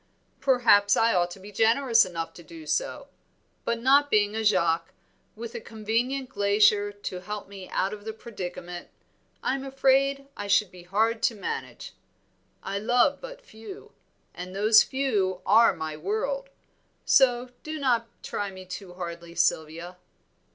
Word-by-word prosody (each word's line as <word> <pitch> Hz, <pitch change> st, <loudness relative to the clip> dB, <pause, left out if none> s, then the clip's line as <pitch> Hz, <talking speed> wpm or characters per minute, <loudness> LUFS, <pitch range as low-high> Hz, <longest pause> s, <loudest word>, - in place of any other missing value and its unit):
"Perhaps 230 Hz, -7 st, +4 dB
I 230 Hz, 0 st, +3 dB
ought 175 Hz, -1 st, +2 dB
to 175 Hz, -, -10 dB
be 200 Hz, +2 st, -11 dB
generous 230 Hz, +3 st, +4 dB
enough 165 Hz, -2 st, -5 dB
to -, -, -12 dB
do 165 Hz, -1 st, -12 dB
so, 155 Hz, +1 st, -2 dB, 0.6 s
but 235 Hz, 0 st, -1 dB
not 280 Hz, +4 st, +4 dB
being 210 Hz, -3 st, +2 dB
a 220 Hz, -, -1 dB
Jaques, 170 Hz, -6 st, +2 dB, 0.4 s
with 230 Hz, +1 st, -7 dB
a 235 Hz, -, -6 dB
convenient 230 Hz, +5 st, -2 dB
glacier 205 Hz, -2 st, +3 dB
to 205 Hz, -3 st, -6 dB
help 210 Hz, +2 st, -6 dB
me 195 Hz, -2 st, -10 dB
out 190 Hz, -, -1 dB
of 205 Hz, -1 st, -9 dB
the 220 Hz, -, -4 dB
predicament, 180 Hz, -5 st, -8 dB, 0.5 s
I -, -, +1 dB
am 270 Hz, 0 st, -3 dB
afraid 275 Hz, +1 st, +1 dB
I 205 Hz, -, -6 dB
should 200 Hz, -1 st, +3 dB
be 180 Hz, -, -13 dB
hard 220 Hz, +6 st, 0 dB
to 230 Hz, -, +1 dB
manage. 450 Hz, -, -6 dB, 0.7 s
I 200 Hz, +1 st, -3 dB
love 245 Hz, +6 st, +2 dB
but -, -, -10 dB
few, 220 Hz, -, -11 dB, 0.4 s
and 180 Hz, +1 st, -8 dB
those 215 Hz, +2 st, +6 dB
few 210 Hz, -10 st, -1 dB
are 230 Hz, +1 st, +6 dB
my 160 Hz, -3 st, -5 dB
world; 220 Hz, -, -3 dB, 0.6 s
so 250 Hz, -2 st, +4 dB
do 310 Hz, 0 st, -5 dB
not 245 Hz, -5 st, +1 dB, 0.2 s
try 205 Hz, -1 st, -3 dB
me 185 Hz, -1 st, -11 dB
too 185 Hz, -1 st, -8 dB
hardly, 170 Hz, -1 st, -7 dB
Sylvia." 165 Hz, +4 st, -1 dB
210 Hz, 155 wpm, -26 LUFS, 185-245 Hz, 0.7 s, those